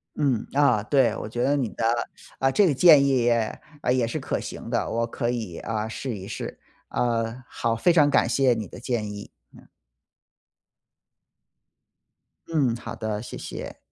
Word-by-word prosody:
嗯， 135 -7 0
啊， 135 -6 +4
对， 120 -2 +3
我 - - -5
觉 120 +2 -2
得 145 - +3
你 130 -6 0
的 - - -5 0.6
啊， 135 - +3
这 205 +9 +4
个 155 - +2
建 150 0 +7
议 135 -1 +3
也 115 -2 +1 0.4
也 125 -3 +1
是 115 - -3
可 - - -2
行 - - -7
的， - - 0
我 115 +1 0
可 120 0 -2
以 110 -8 -3
啊， 110 -1 -3
试 120 +2 -4
一 95 0 -8
试。 105 - -6 0.3
啊， 115 +1 -1
好， 115 -1 -1
非 115 +10 +3
常 150 -4 +5
感 140 - +3
谢 135 -2 +3
你 110 -2 -3
的 - - -11
建 120 -4 -2
议。 100 0 -8 0.2
嗯。 - - -17 2.8
嗯， 145 -7 +2
好 120 - -7
的， 110 -2 -3
谢 120 - -8
谢。 - - -7
120 Hz, 180 characters per minute, -25 LUFS, 110-135 Hz, 2.8 s, 建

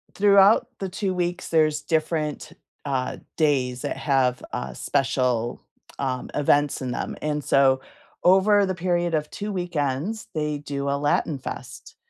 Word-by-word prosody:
throughout 200 +1 +5
the 195 -1 -3
2 190 0 -2
weeks, 175 0 -2
there's 155 -2 +2
different, 155 -2 -1 0.3
uh, 130 -2 -2 0.2
days 130 -5 +1
that - - -2
have, 130 -3 +1
uh, 65 -1 -4
special, 125 - 0 0.4
um, 130 -2 -2
events 145 -1 +2
in 130 - -3
them. - - -3
And 150 -1 -2
so, 135 -1 +4 0.4
over 200 +3 +5
the 190 - -1
period 175 -1 0
of 150 -1 0
2 210 +1 -5
weekends, 175 +3 -2
they 150 -1 -1
do 140 -1 -4
a 140 - +1
Latin 150 -4 0
Fest, 125 -2 -8
150 Hz, 145 wpm, -24 LUFS, 135-180 Hz, 0.4 s, throughout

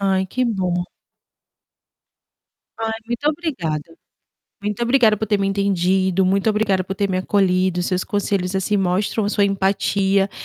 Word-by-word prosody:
Ai 190 -1 +1
que 255 +7 -1
bom. 180 -5 -1 1.9
Ai, 225 0 -2
muito 240 +5 -3
obrigada. 170 - -4 0.6
Muito 210 +2 -3
obrigada 235 -3 +4
por 220 - -2
ter 205 -1 +1
me 195 - 0
entendido, 190 -1 +1
muito 195 +3 +2
obrigada 210 -3 +1
por 190 +1 -5
ter 200 +1 -1
me 185 - 0
acolhido, 185 -2 +1
seus 180 +1 -1
conselhos 195 -2 -1
assim, 200 +2 0
mostram 195 +3 0
sua 205 -1 +2
empatia, 195 0 +1
195 Hz, 140 wpm, -20 LUFS, 185-210 Hz, 1.9 s, obrigada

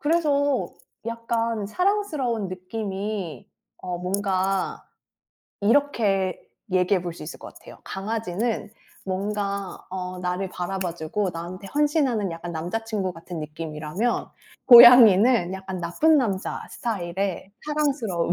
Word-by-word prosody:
그래서 290 -4 +1 0.4
약간 230 -2 -2
사랑스러운 300 - 0
느낌이 190 - -5 0.3
어 180 -1 -4
뭔가 190 0 -1 0.8
이렇게 205 -6 +2 0.3
얘기해 185 0 +2
볼 175 -1 -4
수 - - -10
있을 155 - -8
것 - - -11
같아요. - - -14
강아지는 215 +1 -3 0.3
뭔가 200 0 -3
어 185 -1 -5
나를 180 +1 -2
바라봐 180 -1 -3
주고 175 +4 -2
나한테 175 +4 -7
헌신하는 280 - +1
약간 170 +1 -6
남자친구 190 +3 -3
같은 165 0 -8
느낌이라면 155 +7 -3 0.4
고양이는 235 -5 +9
약간 190 -1 -6
나쁜 300 - +3
남자 200 -7 -2
스타일 190 -8 -4 0.5
사랑스러움. 275 - 0
195 Hz, 270 characters per minute, -24 LUFS, 180-230 Hz, 0.8 s, 고양이는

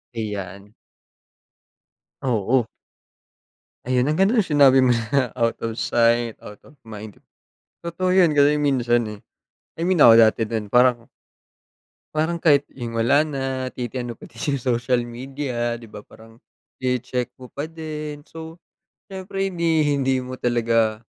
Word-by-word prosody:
Ayan. 100 -2 -6 1.5
Oo. 120 -1 +1 1.2
Ayan, 130 +2 +1
ang 155 - 0
ganda 195 +4 +3
nung 230 - +4
sinabi 140 -3 +5
mo 130 - +3 0.2
na 130 -4 +2
out 115 0 0
of 115 0 -4
sight 115 0 +2
out 105 0 -11
of 145 - -18
mind 110 -2 -10 0.6
Totoo 180 +2 -1
yun 175 -5 +4
kasi 145 +1 +4
minsan 120 -4 +2
eh, 105 -1 -9 0.6
I - - -1
mean 180 -5 +2
ako 115 - +9
dati 110 0 +4
din 110 -1 -4
parang 125 +1 +3 1.1
parang 165 +2 0
kahit 145 -4 +4
yung 120 -3 -7
wala 140 +7 +3
na, 135 -3 -4 0.3
titingnan 120 -1 -5
pati 115 - -14 0.2
sa 125 -1 -1
social 120 +1 0
media 120 0 -4
'di 115 -2 -13
ba? - - -9
Parang 115 +1 -18 0.4
tsine-check 125 -1 -2
mo 125 -1 -13
pa 145 +2 -5
din. 155 -2 -7
So, 160 +1 -11 0.5
siyempre 195 0 -4
hindi 165 -5 +1
hindi 135 -1 +1
mo 130 0 -6
talaga 115 -3 +1
125 Hz, 140 wpm, -22 LUFS, 115-150 Hz, 1.5 s, ako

